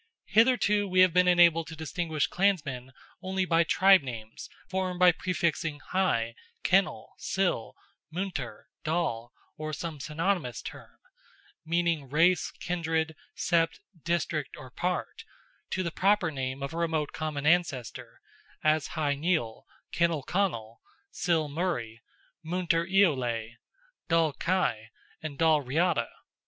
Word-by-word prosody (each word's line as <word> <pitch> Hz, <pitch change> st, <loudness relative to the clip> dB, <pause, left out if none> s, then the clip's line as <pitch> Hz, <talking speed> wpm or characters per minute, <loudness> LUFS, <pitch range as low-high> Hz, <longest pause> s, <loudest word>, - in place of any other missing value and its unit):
Hitherto, 210 Hz, -2 st, +3 dB
we 185 Hz, -1 st, +4 dB
have 185 Hz, -2 st, +5 dB
been 180 Hz, 0 st, +4 dB
enabled 170 Hz, -2 st, +5 dB
to 160 Hz, -, -8 dB
distinguish 160 Hz, -1 st, -2 dB
clansmen 145 Hz, -10 st, 0 dB, 0.3 s
only 190 Hz, 0 st, -1 dB
by 170 Hz, -1 st, +3 dB
tribe 190 Hz, +3 st, +5 dB
names 115 Hz, -4 st, -8 dB, 0.2 s
formed 185 Hz, -1 st, -2 dB
by 180 Hz, -1 st, +7 dB
prefixing 170 Hz, -3 st, -1 dB
Hy, 115 Hz, -12 st, +1 dB, 0.3 s
Kinnel, -, -, +1 dB
Sil, -, -, -1 dB, 0.3 s
Muintir, 160 Hz, -, -4 dB, 0.2 s
Dal, 155 Hz, -8 st, -1 dB, 0.3 s
or 155 Hz, 0 st, -5 dB
some 160 Hz, -1 st, -5 dB
synonymous 160 Hz, -2 st, -2 dB
term, -, -, -10 dB, 0.7 s
meaning 170 Hz, -4 st, 0 dB
race, 165 Hz, +5 st, +3 dB
kindred, 160 Hz, -2 st, -2 dB, 0.2 s
sept, 165 Hz, -1 st, +1 dB, 0.3 s
district, 165 Hz, -4 st, -1 dB
or 130 Hz, -4 st, -11 dB
part, 180 Hz, +7 st, -3 dB, 0.5 s
to 185 Hz, -, -1 dB
the 170 Hz, -, -2 dB
proper 195 Hz, -1 st, +2 dB
name 135 Hz, -1 st, -4 dB
of 140 Hz, -, -4 dB
a -, -, -5 dB
remote 160 Hz, -3 st, -1 dB
common 150 Hz, -3 st, -4 dB
ancestor, 150 Hz, -8 st, 0 dB, 0.4 s
as 155 Hz, -2 st, +2 dB
Hy 145 Hz, -2 st, +1 dB
Nial, 140 Hz, -7 st, -1 dB, 0.2 s
Kinnel 170 Hz, -4 st, +1 dB
Connel, 115 Hz, -, -2 dB, 0.3 s
Sil 170 Hz, -4 st, +1 dB
Murray, 140 Hz, -8 st, -3 dB, 0.4 s
Muintir 170 Hz, 0 st, 0 dB
Eolais, 125 Hz, -, +1 dB, 0.5 s
Dal 165 Hz, -2 st, +3 dB
g -, -, -24 dB
Cais, 170 Hz, -12 st, 0 dB, 0.3 s
and 155 Hz, -3 st, -6 dB
Dal 160 Hz, -1 st, +4 dB
Riada. 145 Hz, -1 st, +1 dB
165 Hz, 125 wpm, -28 LUFS, 140-180 Hz, 0.7 s, by